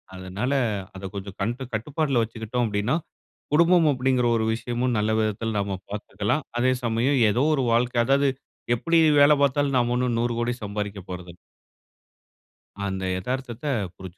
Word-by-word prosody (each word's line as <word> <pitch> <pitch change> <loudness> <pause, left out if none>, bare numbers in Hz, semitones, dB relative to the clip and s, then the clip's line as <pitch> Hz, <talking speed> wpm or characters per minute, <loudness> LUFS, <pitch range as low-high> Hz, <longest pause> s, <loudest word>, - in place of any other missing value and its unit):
அதனால 95 +8 -3 0.4
அத 95 - -8
கொஞ்சம் 100 -1 -7
கண்டு 120 +6 -2
கட்டுப்பாட்ல 135 +3 0
வச்சுக்கிட்டோம் 115 +2 -2
அப்டின்னா, 105 +6 0 0.6
குடும்பம் 170 +1 +5
அப்டிங்கிற 130 -2 +1
ஒரு 110 - 0
விஷயமும் 120 +2 -1
நல்ல 105 +1 +1
விதத்துல 110 0 -1
நாம 100 -1 -2
பாத்துக்கலாம். 105 +6 -2
அதே 130 +1 +3
சமயம் 120 +4 +1
ஏதோ 120 +6 +1
ஒரு 135 - 0
வாழ்க்க 120 0 +2
அதாவது 140 +2 +3 0.5
எப்டி 165 +7 +2 0.2
வேல 145 +1 +7
பாத்தாலும் 140 0 +1
நாம 120 -1 +1
ஒண்ணும் 125 -1 0
100 120 0 0
கோடி 120 +1 0
சம்பாரிக்கப் 100 -2 -5
போறதில்ல. 90 -1 -8 1.5
அந்த 95 -1 -3 0.2
எதார்த்தத்த 125 +4 -5 0.3
புரிஞ்சுக்கணும். 95 0 -10
120 Hz, 140 wpm, -25 LUFS, 105-130 Hz, 1.5 s, வேல